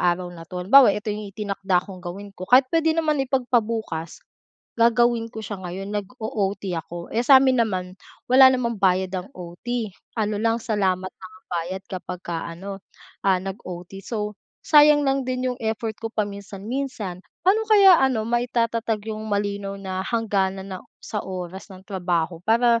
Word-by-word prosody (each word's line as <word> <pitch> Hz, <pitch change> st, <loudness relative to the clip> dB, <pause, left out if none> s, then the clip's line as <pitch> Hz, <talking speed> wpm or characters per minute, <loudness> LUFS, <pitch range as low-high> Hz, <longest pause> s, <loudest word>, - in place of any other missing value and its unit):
araw 175 Hz, 0 st, 0 dB
na 165 Hz, -1 st, -11 dB
'to. 180 Hz, 0 st, -5 dB
Halimbawa, 270 Hz, +7 st, +8 dB
ito 210 Hz, 0 st, -3 dB
yung 210 Hz, 0 st, -6 dB
itinakda 195 Hz, -2 st, -1 dB
kong 190 Hz, -3 st, -10 dB
gawin 195 Hz, +3 st, -8 dB
ko 185 Hz, -1 st, -9 dB
kahit 255 Hz, +3 st, +7 dB
puwede 325 Hz, -1 st, +2 dB
naman 305 Hz, -3 st, +1 dB
ipagpabukas, 230 Hz, -, -1 dB, 0.5 s
gagawin 235 Hz, 0 st, +3 dB
ko 220 Hz, -, -6 dB
siya 200 Hz, -1 st, -6 dB
ngayon, 190 Hz, +3 st, -6 dB
nag-o-OT 205 Hz, -2 st, -3 dB, 0.2 s
ako. 170 Hz, +1 st, -9 dB
Eh, 230 Hz, -, +2 dB
sa 270 Hz, +1 st, +8 dB
amin 260 Hz, -2 st, +3 dB
naman, 185 Hz, -4 st, -3 dB, 0.4 s
wala 260 Hz, +1 st, +9 dB
namang 235 Hz, -3 st, -1 dB
bayad 185 Hz, -1 st, +2 dB
ang 185 Hz, +1 st, -5 dB
O-T 200 Hz, +6 st, -4 dB, 0.3 s
ano 210 Hz, -1 st, 0 dB
lang 225 Hz, 0 st, +2 dB
salamat 190 Hz, -5 st, 0 dB
lang 185 Hz, -1 st, -13 dB
ang 220 Hz, -, -33 dB
bayad 175 Hz, +3 st, -3 dB
kapagka 180 Hz, -2 st, -5 dB
ano, 195 Hz, +4 st, -7 dB, 0.5 s
ah, 190 Hz, -1 st, +5 dB
nag-OT. 190 Hz, -1 st, -7 dB
So, 210 Hz, -2 st, -3 dB, 0.3 s
sayang 295 Hz, -1 st, +6 dB
lang 270 Hz, -1 st, +1 dB
din 255 Hz, 0 st, -1 dB
yung 245 Hz, -, -10 dB
effort 220 Hz, 0 st, -2 dB
ko 225 Hz, -, -3 dB
paminsan-minsan. 205 Hz, 0 st, -4 dB, 0.2 s
Paano 405 Hz, +4 st, +4 dB
kaya 395 Hz, -4 st, +8 dB
ano 255 Hz, -5 st, +2 dB
maitatatag 230 Hz, -2 st, -1 dB
yung 215 Hz, 0 st, -6 dB
malinaw 200 Hz, -1 st, -2 dB
na 190 Hz, -1 st, -4 dB
hangganan 195 Hz, -4 st, 0 dB
ng -, -, -19 dB, 0.2 s
sa 210 Hz, -, -3 dB
oras 185 Hz, +1 st, -6 dB
ng 185 Hz, 0 st, -12 dB
trabaho 175 Hz, -4 st, -1 dB
para 230 Hz, +1 st, +4 dB
205 Hz, 160 wpm, -23 LUFS, 185-235 Hz, 0.5 s, wala